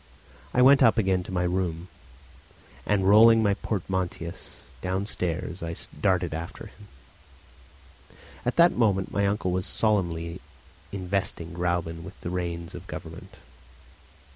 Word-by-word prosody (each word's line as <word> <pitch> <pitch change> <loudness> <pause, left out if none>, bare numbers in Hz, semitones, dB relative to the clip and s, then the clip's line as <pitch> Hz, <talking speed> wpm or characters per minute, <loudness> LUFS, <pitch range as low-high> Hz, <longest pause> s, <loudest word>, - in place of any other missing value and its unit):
I 125 - +4
went 140 +2 +7
up 120 -2 +5
again 95 -4 +2
to - - -8
my 90 -1 0
room, 90 -1 -2 1.0
and 100 -2 +2
rolling 110 +2 +7
my 100 -1 +3
portmanteaus 95 -3 -4 0.2
downstairs 90 -2 -3
I 85 0 -4 0.3
darted 90 -4 +1
after 85 +1 -6
him. 105 - -16 1.6
At 120 - -1
that 170 +1 +6
moment 100 -5 +1
my 100 0 +1
uncle 100 -2 -1
was 90 +2 -1
solemnly 85 -6 0 0.5
investing 95 -3 -2
Gräuben 85 -1 -2
with 95 -3 -11
the 85 - -4
reins 85 -2 -4
of - - -9
government. - - -9
95 Hz, 125 wpm, -26 LUFS, 85-100 Hz, 1.6 s, went